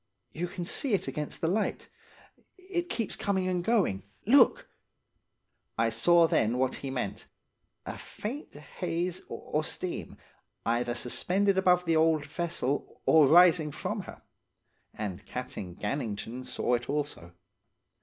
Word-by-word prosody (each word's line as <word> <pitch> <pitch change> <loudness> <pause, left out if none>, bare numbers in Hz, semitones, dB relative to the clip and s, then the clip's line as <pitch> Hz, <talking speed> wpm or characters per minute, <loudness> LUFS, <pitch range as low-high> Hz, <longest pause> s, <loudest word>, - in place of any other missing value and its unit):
'You 175 +3 -2
can 175 0 -5
see 235 +5 +1
it - - -3
against 150 +1 -4
the 165 - +1
light. 205 +5 -1 0.7
It 370 -2 -3
keeps 230 -4 -1
coming 190 -2 0
and 180 -1 0
going. 190 - +2 0.2
Look!' 280 - +5 1.1
"I - - +3
saw 175 -1 +5
then 120 -6 +2
what 130 0 0
he 135 - -5
meant–a 125 -7 -7
faint 255 +8 -6
haze 170 +3 -3
or 155 +1 -2
steam, 175 +2 -4 0.5
either 120 +1 0
suspended 190 +11 +1
above 180 -1 +4
the 165 -1 +3
old 160 -2 +3
vessel 155 -3 -3
or 155 -3 +6
rising 165 -1 +6
from - - -3
her. - - -11 0.7
And 105 -2 -5
Captain 105 -8 -6
Gannington 115 +2 -4
saw 125 0 -1
it 120 +1 -1
also. 145 - -3
160 Hz, 130 wpm, -29 LUFS, 125-185 Hz, 1.1 s, or